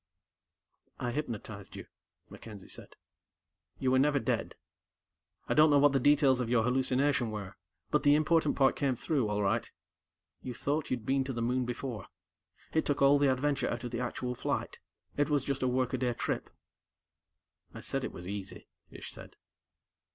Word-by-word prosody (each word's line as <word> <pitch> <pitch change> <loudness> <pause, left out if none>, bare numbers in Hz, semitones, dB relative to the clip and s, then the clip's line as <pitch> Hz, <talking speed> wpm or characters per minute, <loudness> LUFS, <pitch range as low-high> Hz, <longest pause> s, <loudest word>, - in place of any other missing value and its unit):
"I 120 - -2
hypnotized 110 -7 -5
you," - - -8 0.4
MacKenzie 105 -4 -11
said. - - -9 0.8
"You 130 - +1
were 130 - +4
never 145 +1 +3
dead. - - -1 0.9
I - - +1
don't 155 +1 +6
know 145 - +5
what 145 0 +6
the 135 - +3
details 140 -1 +4
of 120 -2 -2
your 115 -2 +3
hallucination 130 0 +1
were, 105 -3 -6 0.4
but - - +3
the 145 0 +5
important 155 0 +2
part 135 -1 +4
came 135 -3 0
through, 130 -3 0
all 105 0 0
right. 110 +4 0 0.7
You 125 -2 -6
thought 145 +5 -1
you'd 120 -4 -2
been 135 0 +2
to 135 - -3
the 120 - -3
Moon 125 +1 +1
before. 120 -3 -5 0.7
It 160 - +2
took 145 -1 0
all 140 +1 +6
the 140 -2 +4
adventure 140 +2 0
out 120 +1 -3
of 120 - -5
the 120 - -3
actual 125 0 -3
flight; 120 - -3 0.4
it 145 +1 +2
was 145 -3 +2
just 140 -1 -2
a 130 - +2
workaday 125 -1 0
trip." - - -2 1.3
"I - - -7
said - - -2
it - - -3
was 90 - -9
easy," 100 -1 -6 0.2
Ish - - -9
said. - - -10
130 Hz, 175 wpm, -31 LUFS, 120-145 Hz, 1.3 s, don't